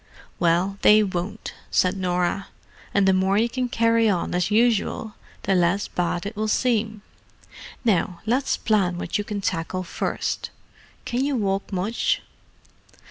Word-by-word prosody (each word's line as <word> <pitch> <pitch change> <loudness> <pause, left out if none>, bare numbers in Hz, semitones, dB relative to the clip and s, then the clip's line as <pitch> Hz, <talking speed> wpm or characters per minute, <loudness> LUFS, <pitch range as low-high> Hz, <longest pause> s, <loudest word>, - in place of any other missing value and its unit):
"Well, 175 +4 +1
they 215 +1 +7
won't," 190 +2 -4 0.2
said 185 +1 +2
Norah. 180 +1 -1 0.4
"And 200 -1 +3
the 190 - +5
more 190 +1 +2
you 225 +2 +3
can 250 +1 -2
carry 230 -1 +3
on 180 -4 -1
as 180 +1 +1
usual, 220 -1 +1 0.3
the 195 - +1
less 180 +2 +2
bad 175 +1 -2
it 205 +2 -5
will 215 +1 -1
seem. 220 -2 0 0.8
Now, 180 -5 +1
let's 255 +5 +1
plan 195 -5 +1
what 180 - -2
you - - -1
can 205 -1 -4
tackle 185 0 -2
first. 175 - -3 0.6
Can 245 +2 -1
you 285 0 0
walk 195 -4 -1
much?" 195 +5 0
200 Hz, 145 wpm, -24 LUFS, 180-220 Hz, 0.8 s, they